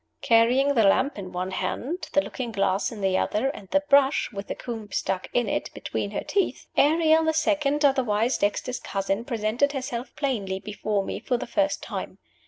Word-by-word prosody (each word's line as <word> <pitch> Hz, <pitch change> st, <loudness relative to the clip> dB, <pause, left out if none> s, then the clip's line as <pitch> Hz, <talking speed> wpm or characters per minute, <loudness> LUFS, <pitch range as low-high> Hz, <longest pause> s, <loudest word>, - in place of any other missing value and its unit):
Carrying 245 Hz, +5 st, +4 dB
the 235 Hz, -, +3 dB
lamp 260 Hz, +5 st, +3 dB
in 185 Hz, -2 st, -7 dB
one 180 Hz, +1 st, -3 dB
hand, 285 Hz, -, -3 dB
the 290 Hz, -, +5 dB
looking 245 Hz, -3 st, -5 dB
glass 195 Hz, -2 st, 0 dB
in 215 Hz, -3 st, -8 dB
the 190 Hz, -1 st, +1 dB
other, 240 Hz, +6 st, 0 dB
and 200 Hz, -9 st, -9 dB
the 290 Hz, -, +3 dB
brush 280 Hz, -1 st, +4 dB
(with 200 Hz, 0 st, -6 dB
the -, -, -4 dB
comb 225 Hz, -4 st, -7 dB
stuck 185 Hz, -1 st, -2 dB
in 245 Hz, -, +1 dB
it) -, -, -2 dB
between -, -, -3 dB
her -, -, -4 dB
teeth, 400 Hz, -2 st, -1 dB
Ariel 320 Hz, +2 st, +4 dB
the 320 Hz, 0 st, +2 dB
Second, 300 Hz, -2 st, +1 dB
otherwise 245 Hz, -4 st, +2 dB
Dexter's 210 Hz, +5 st, -1 dB
cousin, 195 Hz, +2 st, -2 dB
presented 235 Hz, +4 st, 0 dB
herself 260 Hz, -2 st, -5 dB
plainly 205 Hz, -10 st, -2 dB
before 210 Hz, 0 st, -2 dB
me -, -, -4 dB
for 250 Hz, -, -1 dB
the -, -, -5 dB
first 290 Hz, +5 st, 0 dB
time. -, -, -6 dB
240 Hz, 190 wpm, -25 LUFS, 205-285 Hz, -, the